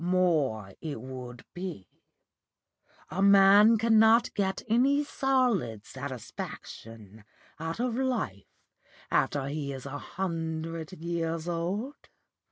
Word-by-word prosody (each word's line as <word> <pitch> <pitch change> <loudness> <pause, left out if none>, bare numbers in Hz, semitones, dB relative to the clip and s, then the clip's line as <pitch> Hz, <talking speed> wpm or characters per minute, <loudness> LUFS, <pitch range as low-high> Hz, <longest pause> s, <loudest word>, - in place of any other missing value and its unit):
More 155 - +1
it 150 -7 -5
would 125 -1 -9
be. 175 - -6 1.2
A 195 - -2
man 200 +3 +7
cannot 225 +1 +5
get 190 -2 -1
any 265 +6 +3
solid 245 - 0
satisfaction 115 -5 -8 0.4
out 165 +4 -4
of 245 -1 0
life 245 - -2 0.6
after 140 -2 +1
he 140 -1 -3
is 135 -1 -7
a 140 +1 -5
hundred 165 -3 -4
years 165 -1 -3
old. 185 +11 -2
170 Hz, 100 wpm, -29 LUFS, 135-215 Hz, 1.2 s, man